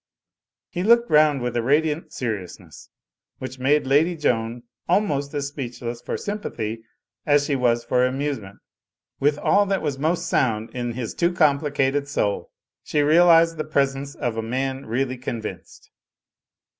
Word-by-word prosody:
"' - - -69
He 175 - -1
looked 235 +2 +4
round 150 -3 +4
with 120 -1 -2
a 120 - +1
radiant 150 +5 +1
seriousness, 105 -8 -6 0.5
which 130 0 -7
made 145 +3 +2
Lady 150 +6 +3
Joan 120 -4 -1 0.3
almost 145 -8 +1
as 140 -1 -2
speechless 120 -4 -6
for - - -4
sympathy 115 - -4 0.4
as 145 -1 +3
she 145 - 0
was 120 -2 +1
for 125 +1 +1
amusement. 130 -6 -2 0.6
With 145 +1 +2
all 205 +6 +3
that 195 -1 -1
was 145 -3 -2
most 160 +4 0
sound 110 -3 0
in 120 -1 -3
his 120 -1 -4
too 170 0 +1
complicated 145 -3 +1
soul 105 -8 -2 0.3
she 150 - 0
realized 165 +1 +5
the 155 - -2
pres 140 -3 +1
ence 140 +1 -7
of 120 -2 -3
a - - 0
man 130 +3 -3
really 130 +2 -2
convinced. 115 -4 -7
140 Hz, 155 wpm, -23 LUFS, 120-155 Hz, 0.6 s, realized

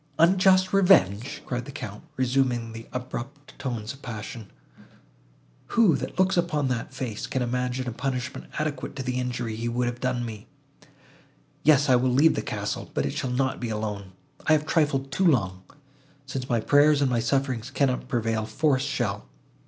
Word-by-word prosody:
"Unjust 185 +3 +4
revenge!" 135 - +3
cried 125 -1 -3
the 140 - -8
Count, 110 -7 -7 0.2
resuming 125 -3 +1
the 115 0 -9
abrupt 130 +3 -6
tones 120 -4 -4
of 140 - -16
passion. 110 -3 -7 1.3
"Who, 210 -10 +6
that 130 -1 -5
looks 185 -1 +3
upon 150 -6 +1
that 120 -2 -2
face, 125 -2 -4
can 130 0 -1
imagine 125 +1 -2
a - - -1
punishment 130 +2 -4
adequate 150 -2 -3
to 135 - -4
the 125 -1 -2
injury 120 -3 -3
he 115 +1 -2
would 120 +1 0
have 120 0 -3
done 125 -1 -1
me? 110 -2 -8 1.1
Yes, 150 -1 +5
I 130 -2 +6
will 130 +1 +2
leave 145 +6 +5
the - - -2
castle; - - -4
but - - +1
it - - -2
shall 130 - -2
not 130 +1 0
be 120 - -3
alone. 105 -3 -4 0.3
I 155 - +6
have 155 -1 +2
trifled 145 -5 +1
too 185 +5 +2
long. 95 - +1 0.6
Since 135 -1 -5
my 120 -3 +2
prayers 145 +4 +5
and 140 - +3
my 120 - +2
sufferings 130 0 0
cannot 130 -2 0
prevail, 115 -4 -1
force 145 0 +1
shall. 120 -7 -2
130 Hz, 175 wpm, -26 LUFS, 120-140 Hz, 1.3 s, Who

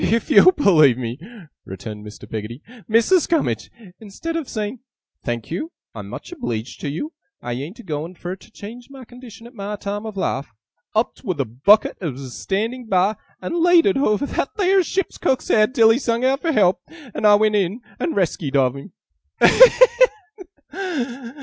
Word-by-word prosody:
'If 230 0 0
you'll 210 - +8
believe 155 - +4
me,' 120 +1 -5 0.4
returned 105 +1 -8
Mr. 105 0 -11
Peggotty, 110 +4 -6 0.2
'Missis 230 - +3
Gummidge, 330 -2 -1 0.4
'stead 330 +12 -5
of 325 -5 -3
saying 215 +3 -4 0.4
"thank 120 +1 -4
you, 310 - -4 0.2
I'm - - -8
much - - -9
obleeged 120 - -5
to 145 - -4
you, 290 - -5 0.3
I 120 0 -5
ain't 145 - -6
a 240 - -12
going 160 +1 -5
fur 180 +2 -6
to 190 - -19
change 235 +5 -11
my 270 -2 -12
condition 240 -2 -13
at 240 - -13
my 205 -2 -5
time 205 +2 -5
of 210 -2 -8
life," 145 -6 -2 0.5
up'd 220 +4 -1
with 185 - -3
a 135 - +1
bucket 135 - +3
as 160 -7 -3
was 130 -1 -9
standing 225 +5 -3
by, 195 +2 +2 0.3
and - - -3
laid 345 0 +5
it 400 - +3
over 270 -2 +1
that - - -3
theer 390 -1 +3
ship's 375 +1 -3
cook's 260 - 0
head 215 +4 +3
'till 225 -3 +6
he 230 - +2
sung 235 -2 -1
out 270 +2 +1
fur 330 - 0
help, 195 - +3 0.3
and 215 - +1
I 205 - +7
went 215 0 +2
in 200 +4 0 0.2
and 330 - -2
reskied 160 -6 -1
of 130 -1 +2
him. 140 +7 -11
210 Hz, 180 wpm, -21 LUFS, -, 0.5 s, you'll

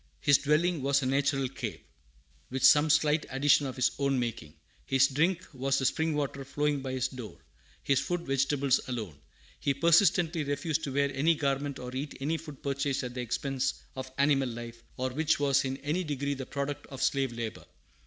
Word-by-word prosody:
His 140 -1 +4
dwelling 155 +3 +1
was 140 +1 +2
a - - -1
natural 135 0 +1
cave, 135 - -6 0.7
with 130 0 -3
some 145 +3 +6
slight 155 0 +3
addition 140 +1 +3
of 130 - -6
his 125 - +2
own 140 -1 +1
making. 115 -11 -4 0.3
His 135 0 +4
drink 165 +7 0
was 135 +1 0
the 130 - 0
spring 160 +4 +1
water 140 -1 -2
flowing 145 +1 -1
by 130 -1 -4
his 130 -1 0
door; 125 -5 -9 0.5
his 140 -1 +2
food, 175 -1 -2
vegetables 135 0 +2
alone. 110 - -5 0.4
He 140 - 0
persistently 170 +1 +3
refused 145 +2 -1
to 140 - -4
wear 140 -1 +1
any 160 +4 +3
garment 140 -1 -1
or 125 0 -7
eat 140 +2 -4
any 155 +4 -1
food 150 -3 -11
purchased 140 -1 -1
at 125 -1 -5
the 125 - -4
expense 135 +2 -1 0.2
of 130 0 -6
animal 140 -2 +3
life, 115 0 -8 0.2
or 130 0 -1
which 155 +3 +1
was 140 -1 +2
in 135 0 -2
any 150 +6 -2
degree 140 -2 -2
the 130 -2 -6
product 145 +1 -4
of 135 -2 -5
slave 135 -2 +1
labor. 115 -2 -6
140 Hz, 190 wpm, -29 LUFS, 130-150 Hz, 0.7 s, some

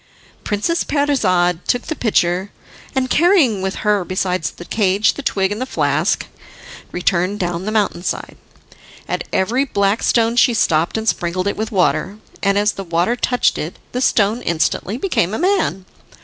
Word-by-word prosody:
Princess 215 +12 0
Parizade 185 - +1
took 245 -1 +1
the 320 - -4
pitcher, 190 -5 +1 0.5
and, 260 -1 +1
carrying 310 - +4
with 190 0 -2
her 210 -2 +2
besides 180 -3 -1
the 175 - -12
cage 200 0 +2
the - - -7
twig 195 -7 0
and 210 +4 -3
the - - 0
flask, - - 0 0.7
returned 180 +3 0
down 175 0 -2
the 215 - -2
mountain 210 -5 0
side. - - -4 0.7
At - - -3
every 235 +8 +1
black 200 -4 0
stone 230 0 +2
she 245 -1 +4
stopped 165 -1 +1
and 220 0 -4
sprinkled 180 -1 0
it 200 - -1
with 220 +2 -4
water, 195 +1 +1 0.2
and 200 0 +2
as 205 +1 +3
the 195 - -7
water 175 +6 0
touched 245 0 +1
it 160 +4 -5
the 250 - -2
stone 220 -1 +2
instantly 170 +5 -1
became 220 - 0
a - - -2
man. 365 - 0
205 Hz, 165 wpm, -18 LUFS, 185-240 Hz, 0.7 s, carrying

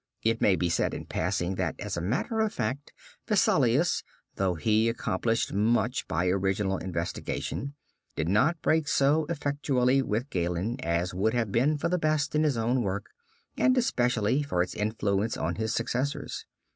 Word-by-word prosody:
It 115 +1 +1
may 95 - +5
be 90 - 0
said, 85 - 0
in - - -6
passing, 90 +1 -1
that, - - -1
as - - -4
a 85 - -2
matter 130 - -1
of 220 -1 +2
fact, 140 -7 -3 0.4
Vesalius, - - +3 0.3
though 95 -2 0
he 110 +6 +2
accomplished 115 0 -1
much 115 +5 +1
by 85 +3 0
original 95 +1 0
investigation, 95 +10 -4 0.4
did 80 - -1
not 110 - +2
break 160 -1 +2
so 150 +3 +3
effectually 140 -4 +1
with 120 +2 -2
Galen 90 +7 -1
as 85 -3 -1
would 110 +5 +1
have 115 -4 0
been 140 +8 +2
for - - -1
the 180 +1 0
best 155 -2 0
in 150 - +2
his 150 -5 +1
own 120 +3 +1
work, 100 -2 -3 0.5
and, 260 0 +3
especially, 125 - +1
for 115 -12 0
its - - -6
influence 105 0 -1
on 85 +2 -2
his 110 0 -1
successors. 130 +4 -2
115 Hz, 165 wpm, -28 LUFS, 95-140 Hz, 0.5 s, may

